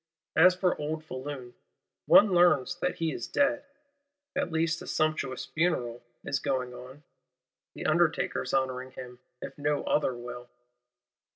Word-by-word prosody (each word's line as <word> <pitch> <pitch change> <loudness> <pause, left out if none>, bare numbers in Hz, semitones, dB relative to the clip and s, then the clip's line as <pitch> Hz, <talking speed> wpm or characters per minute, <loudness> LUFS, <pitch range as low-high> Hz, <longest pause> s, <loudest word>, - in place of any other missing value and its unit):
—As 180 +3 +7
for 180 0 +1
old 155 +1 -3
Foulon, 130 -3 -7 0.5
one 205 -2 +7
learns 175 -4 +4
that 180 - -1
he 165 -2 -1
is 120 - -5
dead; 285 0 +1 0.7
at 175 - -1
least 165 +1 0
a - - -9
"sumptuous 155 -4 -1
funeral" 125 -8 -1 0.2
is 135 - -1
going 130 -3 -2
on; 130 +4 -11 0.7
the - - -7
undertakers 155 -5 +1
honouring 130 -1 -1
him, 125 -1 -10 0.2
if - - -8
no 145 0 0
other 140 -4 +1
will. 120 0 -8
145 Hz, 135 wpm, -29 LUFS, 125-165 Hz, 0.7 s, As